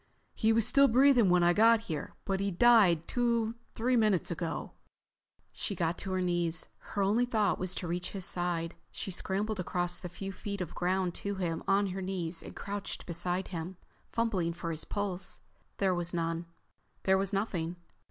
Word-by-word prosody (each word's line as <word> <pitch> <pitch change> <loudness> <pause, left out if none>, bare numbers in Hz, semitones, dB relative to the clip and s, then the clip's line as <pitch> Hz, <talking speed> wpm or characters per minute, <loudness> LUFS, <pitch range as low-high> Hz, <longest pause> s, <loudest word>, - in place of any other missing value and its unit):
He 220 - +2
was 225 -1 +3
still 275 +3 +6
breathing 250 -3 +5
when 180 0 +4
I 175 0 +5
got 225 +3 +5
here, 160 -10 -5
but 195 -1 0
he 200 0 0
died 190 -5 +5
two, 235 -2 +1 0.2
three 250 +3 +2
minutes 215 -7 +2
ago." 170 0 -3 0.8
She 200 - -3
got 170 0 -1
to 190 - -4
her 185 - +1
knees. 175 -2 0
Her 200 - -2
only 215 +5 +3
thought 215 -5 +1
was 185 0 0
to 175 - -4
reach 175 +1 -2
his 190 -2 -4
side. 175 -2 -1 0.2
She 195 - -5
scrambled 200 +3 -2
across 175 0 -1
the 180 - -6
few 195 +3 -6
feet 200 +1 -5
of 180 -4 -4
ground 180 0 0
to 200 0 -2
him 170 -4 -1
still - - -2
on 200 +1 +2
her 190 +1 -4
knees 180 -3 -2
and - - -10
crouched 205 0 -5
beside 175 +2 -2
him, 175 +1 -5 0.3
fumbling 200 -8 0
for 170 0 -4
his 160 -1 -5
pulse. 195 -3 -3 0.4
There 190 -2 +2
was 175 0 -2
none. 165 0 -2 0.6
There 190 0 +4
was 195 0 0
nothing. 180 -5 -1
190 Hz, 185 wpm, -31 LUFS, 175-205 Hz, 0.8 s, still